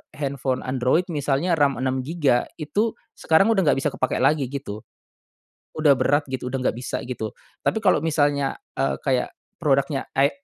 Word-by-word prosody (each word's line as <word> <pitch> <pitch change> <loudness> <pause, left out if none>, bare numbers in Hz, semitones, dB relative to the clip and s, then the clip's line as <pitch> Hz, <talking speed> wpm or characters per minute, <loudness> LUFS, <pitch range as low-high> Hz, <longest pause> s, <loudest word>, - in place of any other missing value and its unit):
handphone 135 -3 -2
android 130 +6 +1
misalnya 150 +3 0
RAM 140 -1 +3
6 130 +1 -1
giga 150 -7 +1
itu 205 +9 -1 0.2
sekarang 195 +8 +4
udah 190 -7 +2
nggak - - +4
bisa 150 - +1
kepake 130 - -1
lagi 140 -1 +3
gitu. 125 -6 -6 0.9
Udah 150 -3 +4
berat 140 +2 +1
gitu 130 -1 -4
udah 130 - -1
nggak 115 - -5
bisa 125 - -4
gitu, 110 -4 -4 0.3
tapi 220 - +1
kalo 185 -6 +3
misalnya, 145 -3 +1 0.2
eee, 135 - 0
kayak 130 -3 0 0.2
produknya 140 -2 +1
i 135 +1 +4
140 Hz, 160 wpm, -23 LUFS, 130-155 Hz, 0.9 s, sekarang